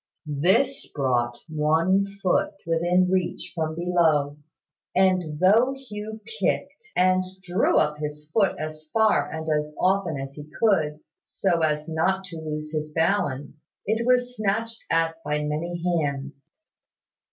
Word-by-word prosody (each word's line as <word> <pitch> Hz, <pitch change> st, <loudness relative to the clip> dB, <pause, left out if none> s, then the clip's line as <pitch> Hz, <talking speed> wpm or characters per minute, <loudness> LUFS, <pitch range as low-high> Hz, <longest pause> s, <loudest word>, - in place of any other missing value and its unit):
This 190 Hz, -, +1 dB
brought 120 Hz, -3 st, 0 dB
one 160 Hz, +5 st, +2 dB
foot 195 Hz, 0 st, 0 dB
within 175 Hz, +2 st, +2 dB
reach 180 Hz, -1 st, -1 dB
from 160 Hz, -2 st, -2 dB
below; 160 Hz, -5 st, +2 dB, 0.6 s
and 180 Hz, -5 st, +2 dB
though 225 Hz, +9 st, +4 dB
Hugh 220 Hz, -4 st, -7 dB, 0.2 s
kicked, 465 Hz, -, -1 dB
and 185 Hz, 0 st, +4 dB, 0.2 s
drew 180 Hz, +1 st, +2 dB
up 150 Hz, 0 st, +2 dB
his 150 Hz, 0 st, -5 dB
foot 200 Hz, -4 st, +2 dB
as 155 Hz, 0 st, -7 dB
far 220 Hz, -1 st, +3 dB
and 160 Hz, 0 st, -5 dB
as 150 Hz, -1 st, -1 dB
often 185 Hz, -5 st, +1 dB
as 135 Hz, 0 st, -6 dB
he 150 Hz, +1 st, -10 dB
could, 155 Hz, -9 st, +2 dB, 0.2 s
so 175 Hz, -4 st, 0 dB
as 150 Hz, -1 st, 0 dB
not 185 Hz, +4 st, 0 dB
to 180 Hz, -3 st, -8 dB
lose 155 Hz, -1 st, -5 dB
his 155 Hz, 0 st, -2 dB
balance, 155 Hz, -4 st, -1 dB, 0.2 s
it 220 Hz, +3 st, 0 dB
was 250 Hz, 0 st, +2 dB
snatched 225 Hz, +2 st, -1 dB
at 165 Hz, 0 st, 0 dB
by 150 Hz, 0 st, -1 dB
many 165 Hz, +3 st, -3 dB
hands. 145 Hz, -5 st, -2 dB
165 Hz, 135 wpm, -25 LUFS, 150-190 Hz, 0.6 s, though